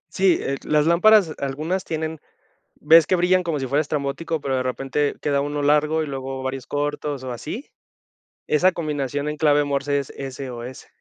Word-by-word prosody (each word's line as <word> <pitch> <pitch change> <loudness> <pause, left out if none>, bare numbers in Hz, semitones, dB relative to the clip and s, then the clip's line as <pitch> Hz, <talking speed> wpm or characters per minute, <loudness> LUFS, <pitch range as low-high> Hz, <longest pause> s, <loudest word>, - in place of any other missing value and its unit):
Sí, 190 -2 +4
eh, 135 0 -2
las 150 0 +2
lámparas, 180 +1 +5
algunas 155 +7 -2
tienen 160 -1 -3 0.6
¿ves 160 +1 +6
que 185 - +3
brillan 180 +1 +3
como 165 -5 -2
si 135 - -2
fuera 140 +4 +1
estrambótico, 150 +2 -3
pero 135 -2 -1
de - - 0
repente 135 +3 -1
queda 140 -1 +1
uno 145 0 -2
largo 150 +2 +2
y - - -3
luego 135 -1 -5
varios 130 -1 -4
cortos 145 -1 -3
o 130 - -5
así? 175 - -7 0.8
Esa 180 +5 +4
combinación 145 -4 -3
en 150 - -3
clave 145 -2 +3
Morse 140 0 0
es 140 - -5 0.2
SOS. 125 -2 -7
145 Hz, 175 wpm, -22 LUFS, 135-160 Hz, 0.8 s, ves